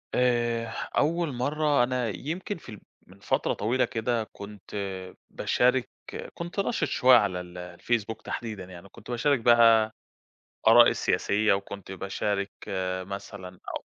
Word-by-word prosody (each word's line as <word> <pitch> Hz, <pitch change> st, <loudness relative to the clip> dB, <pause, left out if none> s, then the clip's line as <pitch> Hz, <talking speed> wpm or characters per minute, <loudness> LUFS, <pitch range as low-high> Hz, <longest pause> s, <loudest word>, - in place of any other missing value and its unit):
آآ، 120 Hz, -2 st, +2 dB, 0.3 s
أول 165 Hz, 0 st, +1 dB
مرة 145 Hz, +2 st, +1 dB
أنا 125 Hz, -1 st, 0 dB
يمكن 165 Hz, -, -4 dB
في 140 Hz, -, -14 dB
ال 105 Hz, -, -10 dB, 0.3 s
من -, -, -17 dB
فترة -, -, 0 dB
طويلة 120 Hz, +5 st, +1 dB
كده 115 Hz, 0 st, -1 dB
كنت 100 Hz, 0 st, -10 dB, 0.5 s
باشارك 125 Hz, 0 st, +1 dB, 0.4 s
كنت 175 Hz, +3 st, -6 dB
نشط 195 Hz, -6 st, 0 dB
شوية 130 Hz, -1 st, +6 dB
على 95 Hz, -5 st, 0 dB
ال 90 Hz, 0 st, -11 dB
آآ، 90 Hz, 0 st, -8 dB
الفيسبوك 110 Hz, +1 st, -2 dB
تحديدًا 110 Hz, -5 st, -5 dB
يعني 90 Hz, +1 st, -12 dB
كنت -, -, -11 dB
باشارك 135 Hz, +2 st, +2 dB
بقى 115 Hz, -2 st, +5 dB, 0.7 s
آرائي -, -, +8 dB
السياسية 105 Hz, +1 st, +1 dB
وكنت 100 Hz, -1 st, -5 dB
باشارك 100 Hz, +1 st, -2 dB, 0.2 s
آآ، 95 Hz, -1 st, -2 dB
مثلًا 100 Hz, -1 st, -8 dB, 0.2 s
أو -, -, -20 dB
115 Hz, 135 wpm, -27 LUFS, 100-125 Hz, 0.7 s, آرائي